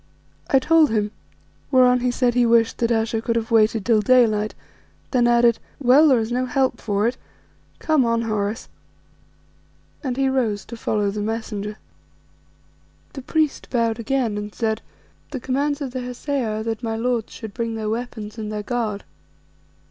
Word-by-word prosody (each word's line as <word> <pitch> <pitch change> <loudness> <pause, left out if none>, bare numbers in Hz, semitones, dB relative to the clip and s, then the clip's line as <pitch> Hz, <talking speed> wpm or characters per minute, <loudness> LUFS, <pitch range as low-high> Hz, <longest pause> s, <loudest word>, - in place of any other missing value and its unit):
I 270 - +5
told 315 +2 +4
him, 210 -2 0 0.6
whereon 250 -2 +5
he 250 +1 0
said 245 0 +1
he 245 0 +3
wished 230 -1 +3
that 235 0 +1
Ayesha 225 0 0
could 230 0 -1
have 230 0 -2
waited 220 -2 +3
till 225 -3 +3
daylight, 215 -2 +3 0.6
then 245 -3 +3
added 235 -1 +4 0.2
"Well, 280 +4 +6
there 265 -4 +5
is 225 0 -2
no 255 +1 0
help 260 -2 0
for 205 +1 0
it. 250 +2 -2 0.6
Come 310 -4 +2
on, 230 -1 +1
Horace," 215 -1 -2 1.4
and 255 -3 -2
he 270 0 +2
rose 235 -7 0
to 235 - -8
follow 210 -3 -1
the 210 +1 -4
messenger. 210 -1 -4 1.4
The 270 - -7
priest 310 +2 -1
bowed 230 -2 0
again 230 -3 -1
and 210 0 -7
said 220 -1 -1 0.5
"The 275 - -5
commands 285 +4 -1
of 270 -3 -3
the 255 0 -4
Hesea 250 0 -3
are - - -4
that 225 0 -3
my 225 -2 -2
lords 235 -1 -1
should 220 -3 -8
bring 230 0 -3
their 220 -1 -3
weapons 225 -1 -5
and 215 -1 -4
their 210 -1 -4
guard." 215 -3 -2
230 Hz, 170 wpm, -22 LUFS, 220-255 Hz, 1.4 s, Well